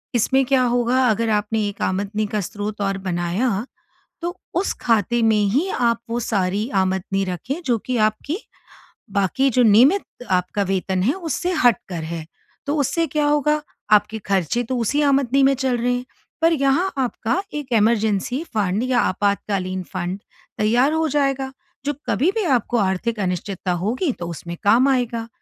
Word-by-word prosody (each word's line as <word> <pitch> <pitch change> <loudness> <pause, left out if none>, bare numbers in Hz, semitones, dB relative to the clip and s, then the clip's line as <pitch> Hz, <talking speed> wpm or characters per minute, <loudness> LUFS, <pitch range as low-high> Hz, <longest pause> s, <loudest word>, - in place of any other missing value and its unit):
इसमें 265 +3 +3
क्या 260 0 +3
होगा 245 +1 +2
अगर 225 +1 +1
आपने 210 0 0
एक 200 - -10
आमदनी 205 +3 -1
का 210 0 -2
स्रोत 205 +2 -5
और 195 -1 0
बनाया, 190 +6 -1 0.6
तो 350 +2 -4 0.2
उस 370 +3 +1
खाते 230 +1 +2
में 220 -2 +3
ही 290 - +1
आप 235 -1 +2
वो 235 +1 -1
सारी 205 -1 0
आमदनी 190 +1 -1
रखें 255 - -4
जो 240 -3 +2
कि 255 -1 -1
आपकी 270 - -4 0.7
बाकी 200 +8 +1
जो 250 +1 +3
नियमित 245 - +5 0.3
आपका 185 +3 +1
वेतन 190 -1 0
है 250 +8 +2
उससे 350 0 -2
हटकर 225 -9 +1
है। 160 0 -5 0.4
तो 290 +1 -1
उससे 330 +4 +1
क्या 300 -1 0
होगा 295 +1 +2 0.3
आपके 210 +1 +3
खर्चे 195 +4 0
तो 255 - +1
उसी 245 +6 +1
आमदनी 275 -1 +3
में 270 +1 +5
चल 260 -2 0
रहे 245 +1 +1
हैं। 245 0 -3 0.4
पर 330 +1 +4
यहाँ 290 +6 +2
आपका 250 - -1
एक 290 -3 -5
इमरज़ेसी 220 - +1
फंड 205 +1 +1
या 255 -1 +2
आपातकालीन 190 -2 0
फंड 180 +3 -3 0.4
तैयार 240 +7 +3
हो 320 0 +1
जाएगा, 275 -2 0 0.3
जो 290 - 0 0.2
कभी 310 - +2
भी 445 - +1
आपको 240 +1 -2
आर्थिक 210 +3 0
अनिश्चितता 185 0 -2
होगी 255 - 0
तो 175 - -4
उसमें 170 +1 -6
काम 235 +6 +5
आएगा। 240 -3 0
230 Hz, 165 wpm, -21 LUFS, 200-270 Hz, 0.7 s, नियमित